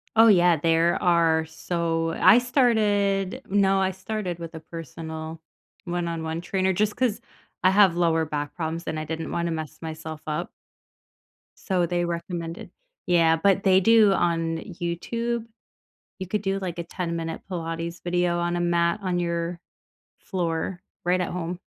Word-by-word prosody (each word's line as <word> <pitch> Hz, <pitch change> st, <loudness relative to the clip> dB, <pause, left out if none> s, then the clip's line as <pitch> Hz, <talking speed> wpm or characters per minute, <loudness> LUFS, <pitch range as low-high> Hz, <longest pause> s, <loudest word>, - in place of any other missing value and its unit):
Oh, 225 Hz, +1 st, +7 dB
yeah. 175 Hz, -5 st, +5 dB
There 165 Hz, +2 st, +2 dB
are 165 Hz, -2 st, +3 dB
so 165 Hz, 0 st, -2 dB
I 225 Hz, -, +8 dB
started 210 Hz, -6 st, +2 dB
no, 195 Hz, -1 st, +3 dB
I 190 Hz, 0 st, +1 dB
started 190 Hz, -2 st, -4 dB
with 165 Hz, -1 st, -8 dB
a 160 Hz, -, -7 dB
personal 160 Hz, 0 st, -7 dB, 0.4 s
one-on-one 170 Hz, -2 st, -3 dB
trainer, 190 Hz, +1 st, 0 dB
just 210 Hz, +3 st, 0 dB
'cause 245 Hz, -5 st, 0 dB, 0.4 s
I 185 Hz, -, +6 dB
have 195 Hz, -3 st, +5 dB
lower 165 Hz, -2 st, +2 dB
back 145 Hz, -1 st, -4 dB
problems, 165 Hz, 0 st, -3 dB
and 155 Hz, -, -2 dB
I 155 Hz, -, -4 dB
didn't 160 Hz, +1 st, -4 dB
wanna 170 Hz, 0 st, -1 dB
mess 160 Hz, -2 st, -5 dB
myself 160 Hz, -1 st, -6 dB
up 155 Hz, +3 st, -2 dB, 1.1 s
so, 180 Hz, -3 st, 0 dB
they 175 Hz, 0 st, 0 dB
recommended 170 Hz, 0 st, -5 dB, 0.3 s
Yeah, 165 Hz, -2 st, +4 dB
but 195 Hz, +3 st, +2 dB
they 190 Hz, -1 st, +5 dB
do 220 Hz, 0 st, +6 dB
on 165 Hz, -2 st, 0 dB
YouTube, 220 Hz, +7 st, -3 dB, 0.7 s
you 185 Hz, -, -5 dB
could 205 Hz, +2 st, -1 dB
do, 195 Hz, -1 st, -1 dB
like, 175 Hz, -2 st, -5 dB
a -, -, -2 dB
ten-minute 165 Hz, -2 st, -4 dB
pilates 165 Hz, -1 st, -4 dB
video 175 Hz, 0 st, +1 dB
on 175 Hz, 0 st, 0 dB
a -, -, -1 dB
mat 170 Hz, +2 st, +1 dB
on 180 Hz, -2 st, -1 dB
your 170 Hz, 0 st, -2 dB, 0.6 s
floor 175 Hz, -1 st, -3 dB, 0.2 s
right 180 Hz, +1 st, +2 dB
at -, -, -2 dB
home. 175 Hz, 0 st, -4 dB
175 Hz, 150 wpm, -25 LUFS, 165-190 Hz, 1.1 s, I